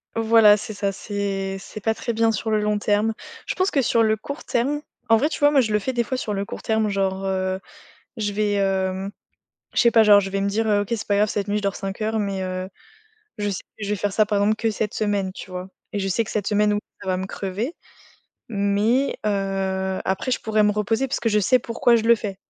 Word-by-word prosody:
Voilà, 225 Hz, -2 st, +6 dB
c'est 215 Hz, +1 st, -6 dB
ça. 200 Hz, 0 st, -1 dB
C'est 195 Hz, -1 st, -3 dB
c'est 215 Hz, -, -9 dB
pas 225 Hz, +1 st, +1 dB
très 235 Hz, -, -3 dB
bien 225 Hz, 0 st, +3 dB
sur 220 Hz, +1 st, -2 dB
le 215 Hz, -1 st, +2 dB
long 210 Hz, 0 st, +1 dB
terme. 210 Hz, +2 st, +1 dB, 0.3 s
Je -, -, -2 dB
pense 375 Hz, +1 st, +1 dB
que 275 Hz, -, +2 dB
sur 230 Hz, -1 st, +3 dB
le 220 Hz, 0 st, +3 dB
court 280 Hz, +7 st, -7 dB
terme 280 Hz, +5 st, 0 dB, 0.3 s
en 225 Hz, -, +7 dB
vrai, 285 Hz, +6 st, +2 dB
tu -, -, -5 dB
vois, 290 Hz, 0 st, +5 dB
moi, 280 Hz, -, +4 dB
je 220 Hz, -3 st, -1 dB
le 210 Hz, -, +3 dB
fais 260 Hz, -, -2 dB
des 240 Hz, -2 st, 0 dB
fois 260 Hz, +3 st, -3 dB
sur 215 Hz, -5 st, -3 dB
le 200 Hz, 0 st, -2 dB
court -, -, -7 dB
terme, 220 Hz, -1 st, +1 dB
genre, 195 Hz, -1 st, -1 dB
heu, 190 Hz, 0 st, -1 dB, 0.6 s
je 205 Hz, -2 st, -1 dB
vais, 205 Hz, 0 st, 0 dB
heu, 190 Hz, 0 st, 0 dB, 0.6 s
je -, -, +1 dB
sais 235 Hz, -, +6 dB
pas, 225 Hz, -1 st, +6 dB
genre, 205 Hz, -1 st, +7 dB
je 195 Hz, -1 st, -3 dB
vais 195 Hz, 0 st, -2 dB
me 200 Hz, -, +1 dB
dire: 220 Hz, +2 st, 0 dB
«OK, 205 Hz, -, -4 dB
c'est 230 Hz, -3 st, -2 dB
pas 200 Hz, -, +2 dB
grave 210 Hz, +1 st, +3 dB
cette 205 Hz, 0 st, -2 dB
nuit, 205 Hz, +1 st, 0 dB
je -, -, -2 dB
dors 200 Hz, 0 st, 0 dB
5 195 Hz, +1 st, -5 dB
heures» 220 Hz, +1 st, 0 dB
mais, 200 Hz, -2 st, -2 dB
heu, 185 Hz, 0 st, -4 dB, 0.7 s
je 205 Hz, 0 st, -1 dB
sais 190 Hz, -, -4 dB
que 210 Hz, -, -12 dB
je -, -, -4 dB
vais 210 Hz, -, +1 dB
faire 205 Hz, +1 st, -1 dB
ça 215 Hz, -, +4 dB
par 205 Hz, -1 st, 0 dB
exemple 210 Hz, +2 st, +3 dB
que 225 Hz, 0 st, 0 dB
cette 210 Hz, 0 st, -2 dB
semaine, 205 Hz, -3 st, 0 dB
tu 185 Hz, -, -10 dB
vois? 180 Hz, +1 st, -6 dB, 0.2 s
Et 205 Hz, -, -1 dB
je 195 Hz, -, -1 dB
sais 225 Hz, +5 st, +1 dB
que -, -, -8 dB
cette 205 Hz, -2 st, -2 dB
semaine 210 Hz, 0 st, +3 dB
oui 205 Hz, -, 0 dB, 0.2 s
ça 190 Hz, -, -9 dB
va 185 Hz, -1 st, +1 dB
me 190 Hz, +1 st, -4 dB
crever. 205 Hz, -, -4 dB, 0.7 s
Mais, 210 Hz, +6 st, +1 dB
heu, 195 Hz, -2 st, -1 dB
après 195 Hz, +7 st, -1 dB
je -, -, +1 dB
pourrais 215 Hz, -1 st, +2 dB
me 210 Hz, -, +4 dB
reposer, 225 Hz, +5 st, 0 dB
puisque 240 Hz, -3 st, -1 dB
je 210 Hz, 0 st, +3 dB
sais 255 Hz, +6 st, +4 dB
pourquoi 235 Hz, +1 st, +2 dB
je 225 Hz, -, +1 dB
le 235 Hz, +1 st, +6 dB
fais. 200 Hz, -3 st, -5 dB
210 Hz, 260 wpm, -23 LUFS, 195-225 Hz, 0.7 s, en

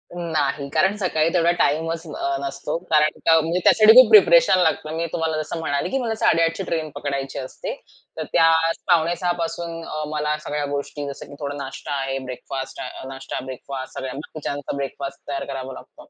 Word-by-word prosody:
नाही. 150 Hz, -4 st, -1 dB
कारण 190 Hz, +2 st, +3 dB
सकाळी 165 Hz, -5 st, +1 dB
तेवढा 170 Hz, -1 st, +4 dB
टाईमच 165 Hz, +3 st, +1 dB
अ, 140 Hz, -2 st, -2 dB
नसतो. 140 Hz, +3 st, -3 dB
कारण 150 Hz, -1 st, +3 dB
का 165 Hz, 0 st, +6 dB
म्हणजे 165 Hz, +3 st, 0 dB
त्यासाठी 215 Hz, 0 st, +7 dB
खूप 255 Hz, +1 st, +9 dB
प्रिपरेशन 465 Hz, -, +7 dB
लागतं. 155 Hz, -3 st, +1 dB
मी 165 Hz, -, -1 dB
तुम्हाला 160 Hz, -1 st, -1 dB
जसं 165 Hz, +2 st, -5 dB
म्हणाले 145 Hz, -3 st, -1 dB
की 270 Hz, -, 0 dB
मला 230 Hz, -3 st, -1 dB
8:30 165 Hz, -5 st, +2 dB
ची 195 Hz, -, -3 dB
ट्रेन 160 Hz, -3 st, -2 dB
पकडायची 140 Hz, -2 st, -3 dB
असते. -, -, -6 dB, 0.4 s
तर -, -, -2 dB
त्या 165 Hz, -1 st, +6 dB, 0.4 s
5:45 175 Hz, +1 st, +2 dB
पासून 165 Hz, 0 st, -4 dB
अ, 155 Hz, 0 st, -4 dB
मला 150 Hz, 0 st, -1 dB
सगळ्या 145 Hz, 0 st, -2 dB
गोष्टी 145 Hz, 0 st, -4 dB
जसं 140 Hz, -, -7 dB
की 145 Hz, -, -10 dB
थोडा 145 Hz, -1 st, -4 dB
नाश्ता 135 Hz, +2 st, -7 dB
आहे, 135 Hz, 0 st, -2 dB
ब्रेकफास्ट 130 Hz, +1 st, -6 dB
अ, -, -, -7 dB
नाष्टा, 135 Hz, 0 st, -6 dB
ब्रेकफास्ट 130 Hz, +1 st, -7 dB
सगळ्या 130 Hz, -1 st, -4 dB
बाकीच्यांचा 145 Hz, -2 st, -5 dB
ब्रेकफास्ट 140 Hz, 0 st, -5 dB
तयार 140 Hz, -1 st, -3 dB
करावा 135 Hz, -1 st, -6 dB
लागतो -, -, -14 dB
155 Hz, 180 wpm, -22 LUFS, 140-170 Hz, 0.4 s, खूप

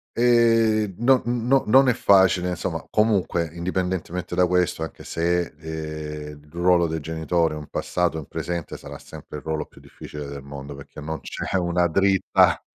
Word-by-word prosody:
ehm, 115 Hz, -4 st, +3 dB
no 125 Hz, +3 st, +4 dB
no 120 Hz, +3 st, +1 dB
non 135 Hz, +4 st, +6 dB
è 125 Hz, -, +5 dB
facile 95 Hz, -3 st, +4 dB
insomma, 90 Hz, -, -3 dB
comunque 100 Hz, -6 st, +1 dB
indipendentemente 90 Hz, 0 st, -3 dB
da 90 Hz, 0 st, +4 dB
questo 90 Hz, -2 st, +1 dB
anche 80 Hz, -, -8 dB
se, 85 Hz, 0 st, 0 dB
ehm, 75 Hz, -2 st, -6 dB
il 75 Hz, -, -21 dB
ruolo 85 Hz, 0 st, +3 dB
dei 80 Hz, 0 st, -3 dB
genitori 80 Hz, +1 st, 0 dB
è -, -, -5 dB
un 75 Hz, -1 st, -8 dB
passato, 90 Hz, -2 st, -1 dB
in 80 Hz, -, -6 dB
presente 85 Hz, -2 st, -4 dB
sarà -, -, -9 dB
sempre 75 Hz, -, -10 dB
il -, -, -10 dB
ruolo 80 Hz, -1 st, -2 dB
più -, -, -19 dB
difficile 75 Hz, -1 st, -9 dB
del 70 Hz, 0 st, -7 dB
mondo, 70 Hz, 0 st, -8 dB
perché 70 Hz, -, -11 dB
non 80 Hz, +1 st, -5 dB
c'è -, -, -4 dB
una 90 Hz, -1 st, +1 dB
dritta 95 Hz, +3 st, +3 dB
85 Hz, 170 wpm, -24 LUFS, 80-95 Hz, -, non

